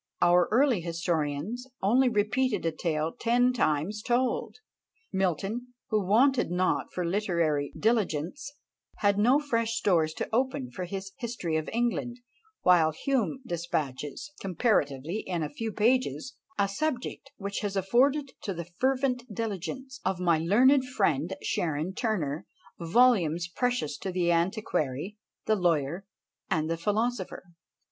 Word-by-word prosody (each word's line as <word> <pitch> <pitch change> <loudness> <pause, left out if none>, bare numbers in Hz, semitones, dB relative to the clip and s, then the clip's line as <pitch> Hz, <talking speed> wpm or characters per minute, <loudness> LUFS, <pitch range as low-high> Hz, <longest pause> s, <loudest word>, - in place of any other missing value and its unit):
Our 175 0 +5
early 245 -4 +3
historians 170 - -2
only 245 +6 +4
repeated 230 +2 +1
a 165 - +2
tale 160 -1 -1
ten 245 +2 +3
times 195 -1 0
told. 245 +2 0 0.6
Milton, 195 +7 -1 0.2
who 215 -2 +1
wanted 245 +6 +3
not 180 +1 0
for 180 - -2
literary 170 -6 0
diligence, 215 - 0 0.4
had 200 -1 +2
no 245 +6 +5
fresh 230 -6 -1
stores 160 -5 +2
to - - -3
open 235 - 0
for 180 +7 -5
his 195 +2 -6
"History 230 -9 -3
of 155 -1 -1
England;" 240 +1 -1 0.5
while 175 -3 +5
Hume 260 - -1
despatches, 160 - -3
comparatively 175 - 0
in 175 -6 -3
a 150 - -4
few 225 +6 -3
pages, 225 - +1 0.2
a 200 -1 +3
subject 265 +4 -3
which 200 0 -4
has 205 -2 -3
afforded 260 +9 +2
to 195 -4 -3
the 170 0 -5
fervent 255 - -1
diligence 230 - -5
of 190 -1 -1
my 170 -3 +3
learned 250 - +5
friend 175 - 0
Sharon 160 +2 -1
Turner 185 - -2 0.3
volumes 175 -3 +3
precious 245 - -1
to 190 - -3
the 175 -1 +1
antiquary, 175 - -1 0.3
the 220 - +3
lawyer, 175 0 0 0.4
and 160 -3 0
the 165 - 0
philosopher. 210 +3 -1
195 Hz, 130 wpm, -28 LUFS, 170-240 Hz, 0.6 s, Our